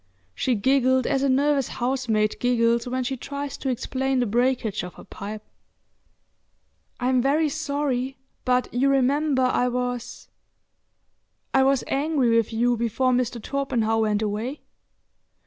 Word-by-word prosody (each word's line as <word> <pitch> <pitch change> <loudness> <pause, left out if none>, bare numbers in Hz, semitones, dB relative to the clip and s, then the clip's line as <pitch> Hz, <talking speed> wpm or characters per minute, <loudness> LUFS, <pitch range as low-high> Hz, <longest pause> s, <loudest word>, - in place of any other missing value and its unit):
She 250 - 0
giggled 260 +3 +2
as 270 -2 +1
a 275 - +2
nervous 275 0 +2
housemaid 240 -4 0
giggles 235 -1 +2
when 255 +1 -1
she 265 +2 -2
tries 280 +2 -5
to 270 - -3
explain 260 +1 -1
the 245 - +2
breakage 240 -1 0
of 180 0 -9
a - - -11
pipe. 210 +1 -8 1.6
"I'm 255 0 +2
very 295 +4 +2
sorry, 280 -4 -2 0.3
but 250 0 +2
you 260 +3 +2
remember 275 +1 +2
I 255 0 +2
was—I 250 +1 -6
was 270 0 +3
angry 275 -5 +1
with 230 -1 +2
you 240 +2 +2
before 235 +3 +1
Mr. 245 -1 0
Torpenhow 230 -3 -1
went 215 -1 +1
away?" 220 +7 -3
255 Hz, 130 wpm, -24 LUFS, 235-270 Hz, 1.6 s, was